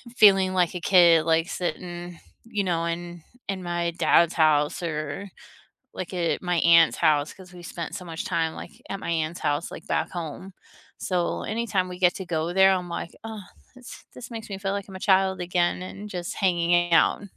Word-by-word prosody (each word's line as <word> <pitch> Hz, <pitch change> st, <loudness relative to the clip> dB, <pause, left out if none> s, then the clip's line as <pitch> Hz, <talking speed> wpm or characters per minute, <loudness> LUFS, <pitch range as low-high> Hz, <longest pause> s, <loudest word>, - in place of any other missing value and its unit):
feeling 195 Hz, -4 st, +6 dB
like 180 Hz, -1 st, +1 dB
a -, -, -2 dB
kid, 170 Hz, -4 st, +5 dB
like, 165 Hz, +2 st, +2 dB
sitting, 175 Hz, -1 st, -5 dB, 0.3 s
you 210 Hz, -3 st, -2 dB
know, 170 Hz, -3 st, -1 dB
in 170 Hz, 0 st, -5 dB, 0.3 s
in 190 Hz, -2 st, -3 dB
my 175 Hz, -1 st, -1 dB
dad's 170 Hz, 0 st, +4 dB
house 155 Hz, 0 st, +2 dB
or, 155 Hz, +3 st, -4 dB, 0.7 s
like, 185 Hz, -, -6 dB
at 175 Hz, -2 st, -1 dB
my 180 Hz, -1 st, 0 dB
aunt's 165 Hz, 0 st, +5 dB
house, 150 Hz, -1 st, +2 dB
'cause 185 Hz, -2 st, -15 dB
we 175 Hz, -, -11 dB
spent 170 Hz, -1 st, -6 dB
so 185 Hz, -2 st, -6 dB
much 165 Hz, -1 st, -6 dB
time, 165 Hz, -3 st, -1 dB
like, -, -, -9 dB, 0.2 s
at 195 Hz, -, -4 dB
my -, -, -4 dB
aunt's 165 Hz, +1 st, -2 dB
house, 145 Hz, +3 st, -1 dB
like, -, -, -10 dB
back -, -, -1 dB
home. 175 Hz, +2 st, -7 dB, 0.5 s
So 180 Hz, -2 st, -1 dB
anytime 215 Hz, -4 st, -1 dB
we 180 Hz, -, -8 dB
get 180 Hz, -1 st, +3 dB
to 190 Hz, -, -6 dB
go 165 Hz, 0 st, -2 dB
there, 190 Hz, 0 st, +6 dB
I'm 180 Hz, -2 st, -2 dB
like, 170 Hz, -, -5 dB
"Oh, 220 Hz, -2 st, -7 dB, 0.3 s
this 250 Hz, -1 st, -12 dB
this 245 Hz, 0 st, -10 dB
makes 225 Hz, -2 st, -8 dB
me 195 Hz, -, -4 dB
feel 195 Hz, 0 st, -2 dB
like 200 Hz, -1 st, -4 dB
I'm 190 Hz, -, -9 dB
a -, -, -7 dB
child 190 Hz, -1 st, +2 dB
again," 175 Hz, 0 st, 0 dB
and 200 Hz, +3 st, -8 dB
just 175 Hz, -2 st, -5 dB
hanging 175 Hz, -2 st, +2 dB
out. 165 Hz, -, +4 dB
175 Hz, 195 wpm, -25 LUFS, 170-190 Hz, 0.7 s, feeling